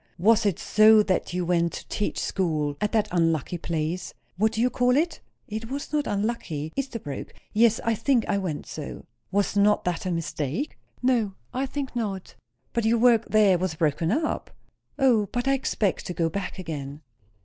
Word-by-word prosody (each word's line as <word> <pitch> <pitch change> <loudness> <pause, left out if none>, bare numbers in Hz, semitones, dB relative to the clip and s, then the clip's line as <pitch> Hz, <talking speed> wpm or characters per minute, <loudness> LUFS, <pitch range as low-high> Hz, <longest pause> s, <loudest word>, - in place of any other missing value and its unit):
"Was 215 +4 +4
it 190 - 0
so 215 0 +6
that 190 -3 0
you 180 0 -1
went 170 -1 +1
to - - -7
teach 210 - -2
school 155 -6 -1
at 210 - +1
that 220 -2 +2
unlucky 165 -1 +1
place? 165 +1 -3 0.2
what 215 +4 +2
do 220 - -3
you 250 +2 +3
call 250 +1 +3
it?" 335 +3 0 0.3
"It 220 +2 -5
was 285 +3 -5
not 295 -1 +1
unlucky. 200 -8 -2
Esterbrooke. 230 - -5 0.2
Yes, 225 +1 +4
I 230 - +3
think 240 +1 +1
I 200 - +1
went 170 -6 -3
so." 150 -2 -7 0.3
"Was 200 +1 +1
not 205 +1 +4
that 180 +1 -2
a - - 0
mistake?" 165 - -3 0.3
"No, 230 -6 +2 0.2
I 265 +2 -1
think 270 -1 -5
not." 200 -6 -3 0.4
"But 235 - 0
your 225 +2 +3
work 230 -1 +5
there 205 -4 +5
was 180 -3 -1
broken 160 +2 +1
up?" 305 +6 -1 0.5
"O, 245 -7 +3
but 245 +4 -3
I 275 - +4
expect 220 -7 -1
to 180 - -4
go 165 -1 +1
back 200 +3 -4
again." 150 -5 -6
205 Hz, 180 wpm, -26 LUFS, 170-235 Hz, 0.5 s, so